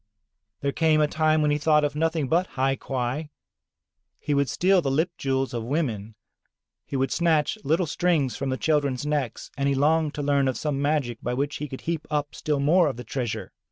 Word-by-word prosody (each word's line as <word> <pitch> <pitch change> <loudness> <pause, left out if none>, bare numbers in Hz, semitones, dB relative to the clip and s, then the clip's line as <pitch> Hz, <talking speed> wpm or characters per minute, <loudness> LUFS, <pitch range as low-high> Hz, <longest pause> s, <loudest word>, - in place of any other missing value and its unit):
There 140 - 0
came 160 0 +3
a 150 - +4
time 155 0 +2
when 150 - +2
he 145 - +1
thought 150 0 +3
of 145 0 -1
nothing 160 -2 0
but 175 +6 +2
hai 135 +1 +2
quai. 135 +4 -3 0.9
He 150 - -2
would 140 -1 +2
steal 185 0 +3
the 140 - -1
lip 160 +7 +1
jewels 135 -3 -1
of 115 -2 -3
women, 115 -6 -2 0.7
he - - -5
would 135 -1 0
snatch 160 -4 +2
little 160 +5 +2
strings 155 -6 +1
from 135 -1 -3
the 130 - -1
children's 145 -4 0
necks, 145 -6 -2
and 140 0 0
he 140 - +1
longed 155 +2 +2
to 145 - -3
learn 140 -1 +2
of 130 - -1
some 145 -3 -2
magic, 140 -6 0
by 125 +1 -2
which 140 +3 -2
he 150 - -4
could 130 -1 -8
heap 165 -2 -3
up 150 -1 -1
still 150 -2 -1
more 165 +5 +4
of 135 - -3
the 125 - -6
treasure. 115 -6 -4
145 Hz, 210 wpm, -25 LUFS, 135-155 Hz, 0.9 s, a